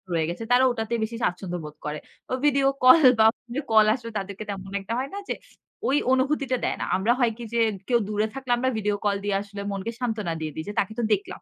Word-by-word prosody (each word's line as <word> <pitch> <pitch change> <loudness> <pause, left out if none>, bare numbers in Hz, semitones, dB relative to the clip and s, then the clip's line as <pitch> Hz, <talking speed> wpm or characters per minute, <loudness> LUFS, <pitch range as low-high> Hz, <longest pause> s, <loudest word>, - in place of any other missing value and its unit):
রয়ে 160 -1 +1
গেছে। 175 +6 -5
তারা 250 +1 +6
ওটাতে 225 -1 -3
বেশি 225 +2 -3
স্বাচ্ছন্দ্যবোধ 175 -4 -3
করে। 150 0 -3 0.3
ও - - 0
ভিডিও 275 -1 +4 0.2
কল 270 +4 +8
বা 220 - +7 0.5
কল 215 -1 +7
আসবে 235 -2 -8
তাদেরকে 200 +1 -5
তেমন 195 -1 -6
একটা 195 +4 -5
হয় 270 +2 -3
না - - -4
যে, - - +1 0.8
অনুভূতিটা 265 -1 +1
দেয় - - 0
না। - - -1
আমরা 195 +5 +2
হয় 240 -3 +3
কি 240 - -7
যে, 235 - +1 0.3
কেউ 240 -2 +3
দূরে 210 +1 0
থাকলে 265 -2 -5
আমরা 260 +2 +1
ভিডিও 210 -1 0
কল 205 -1 +2
দিয়ে 205 -1 0
আসলে 200 0 -8
মনকে 200 +3 -3
সান্ত্বনা 220 -8 -2
দিয়ে 155 -1 -4
দিই। 160 - -4
যে, 205 - -4
তাকে 205 +2 -1
তো - - 0
দেখলাম। 200 - -3
215 Hz, 220 wpm, -25 LUFS, 195-245 Hz, 0.8 s, কল